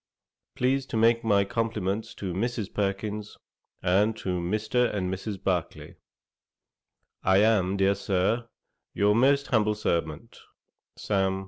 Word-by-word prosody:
'Please 130 +1 0
to 115 - -3
make 115 +1 +3
my 100 -3 +3
compliments 110 -1 -2
to 95 -3 -4
Mrs. 115 +2 -3
Perkins, 105 +1 -3 0.5
and 105 +5 +2
to 90 -4 -2
Mr. 110 +7 0
and 95 -2 -2
Mrs. 100 +2 -5
Barclay. 90 -3 -2 1.3
'I 95 0 +4
am, 100 -3 +3
dear 95 0 +3
Sir, 100 +4 0 0.5
'Your 105 +1 +3
most 140 +5 +3
humble 105 -3 +2
servant, 85 +2 -3 0.6
'SAM. 95 -2 0
105 Hz, 120 wpm, -27 LUFS, 95-115 Hz, 1.3 s, I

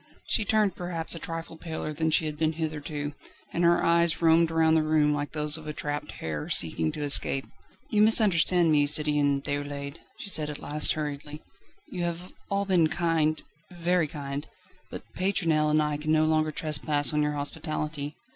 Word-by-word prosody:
She 220 - 0
turned 210 -3 +2
perhaps 175 -2 -3
a 165 - -5
trifle 165 0 -7
paler 160 -2 -5
than 160 +2 -1
she 160 +1 +2
had 155 -1 -4
been 155 +1 0
hitherto, 150 -2 -4 0.4
and 175 - 0
her 170 0 +4
eyes 170 0 +2
roamed 165 0 +4
round 160 -1 +3
the 160 - +4
room 155 -1 +2
like 145 0 -3
those 150 0 +1
of 155 -1 -11
a 150 - -4
trapped 145 0 -5
hare 75 -2 -5
seeking 80 -1 0
to 150 - -5
escape. 140 -1 +4 0.5
"You 210 -2 +3
misunderstand 185 -6 +4
me, 145 -1 +3
Citoyen 145 -2 +2
Déroulède," 145 0 -4 0.2
she 200 - -7
said 150 -3 0
at 150 - -5
last 150 +1 +2
hurriedly. 150 0 -6 0.4
"You 180 - -6
have 175 +1 -4 0.2
all 200 0 0
been 180 -5 +3
kind 160 -1 0 0.3
very 175 -2 0
kind 140 -1 -6 0.4
but - - -8
Pétronelle 165 -5 +1
and 155 0 +3
I 150 -1 -1
can 155 +1 -2
no 155 0 +3
longer 155 0 +2
trespass 150 -1 +1
on 150 - +2
your 150 0 0
hospitality. 150 0 -4
155 Hz, 180 wpm, -27 LUFS, 150-165 Hz, 0.5 s, her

